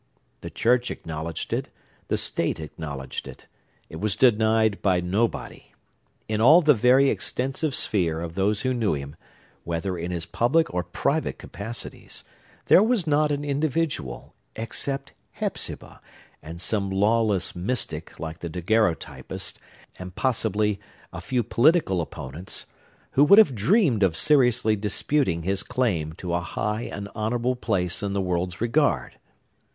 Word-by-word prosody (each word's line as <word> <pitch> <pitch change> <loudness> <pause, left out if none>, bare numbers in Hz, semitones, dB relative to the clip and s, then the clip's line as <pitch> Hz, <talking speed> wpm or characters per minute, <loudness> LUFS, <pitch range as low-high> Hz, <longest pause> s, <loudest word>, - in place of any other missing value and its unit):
The - - -7
church 125 +1 +2
acknowledged 80 0 -5
it; - - -2 0.4
the - - 0
state - - -1
acknowledged 75 -4 -6
it. - - -11 0.4
It 80 - -9
was 105 +3 -1
denied 110 -3 +3
by 95 -3 +3
nobody. 100 +6 -2 0.5
In 110 0 -1
all 155 +9 +7
the 150 -1 +6
very 130 +4 +5
extensive 135 +3 -2
sphere 85 -6 0
of 85 -1 -5
those 100 +3 +1
who 130 -1 0
knew 115 -9 +1
him, 70 +1 -7 0.5
whether 85 +3 -2
in 85 0 -4
his 85 -2 -3
public 120 - +1
or 90 - +1
private - - -1
capacities, 115 +3 -6 0.4
there - - +7
was 220 -4 +2
not 150 0 +2
an 145 0 -2
individual—except 140 - -3 0.2
Hepzibah, - - -5 0.4
and 80 +2 -9
some 100 +2 -1
lawless 105 -1 +1
mystic, 100 +9 -2
like 80 +1 -6
the 85 - -5
daguerreotypist, 90 0 -1 0.4
and, 90 0 -8
possibly, 110 -5 0 0.3
a 85 - -6
few 120 +6 0
political 120 - +3
opponents—who 85 - -4
would 200 +8 +7
have 215 -11 +7
dreamed 135 - +3
of 90 -4 +2
seriously 125 -6 +3
disputing 105 - 0
his 95 +2 0
claim 105 - -1
to 90 0 -5
a 85 - +1
high 105 +6 -3
and 100 0 -5
honorable 120 +3 -1
place 95 -8 -1
in 100 -1 -2
the 100 - 0
world's 90 0 -2
regard. 140 +6 +1
105 Hz, 135 wpm, -25 LUFS, 90-125 Hz, 0.5 s, all